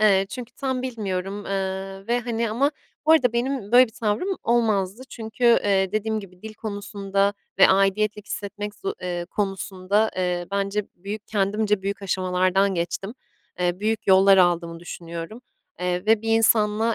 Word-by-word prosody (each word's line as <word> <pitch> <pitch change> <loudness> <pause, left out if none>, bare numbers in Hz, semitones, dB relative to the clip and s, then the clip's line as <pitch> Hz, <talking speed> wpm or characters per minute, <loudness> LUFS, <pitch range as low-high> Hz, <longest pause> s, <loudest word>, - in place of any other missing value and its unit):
Eee, 195 -2 +4
çünkü 250 -1 -7
tam 260 -1 -2
bilmiyorum. 205 -5 -4
Eee, 195 0 -3
ve, 240 +1 +1
hani, 230 -1 -2
ama 275 +7 +2 0.4
bu 320 - +7
arada 250 -7 +4
benim 240 -3 -2
böyle 250 +1 +8
bir 225 - -16
tavrım 230 - -1
olmazdı. 220 -2 +1
Çünkü, 220 +1 -5
eee, 200 -5 +4
dediğim 215 0 -1
gibi 185 -2 -14
dil 220 0 -8
konusunda 200 -2 -2 0.2
ve - - +8
aidiyet 195 +2 +2
hissetmek, 205 0 -6 0.3
eee, 175 -1 -3
konusunda, 195 +1 0
eee, 180 -1 -1
bence 200 +1 -1
büyük 205 +4 -7
kendimce 210 0 0
büyük 200 +1 -3
aşamalardan 185 +1 +1
geçtim. 175 +5 -3 0.5
Eee, 180 +1 0
büyük 220 +1 -1
yollar 195 0 +6
aldım 170 -2 +2
düşünüyorum. 170 +4 -7 0.4
Eee, 180 +2 -1
ve 225 0 +4
bir 225 - -4
insanla 220 0 +3
200 Hz, 150 wpm, -24 LUFS, 190-220 Hz, 0.5 s, böyle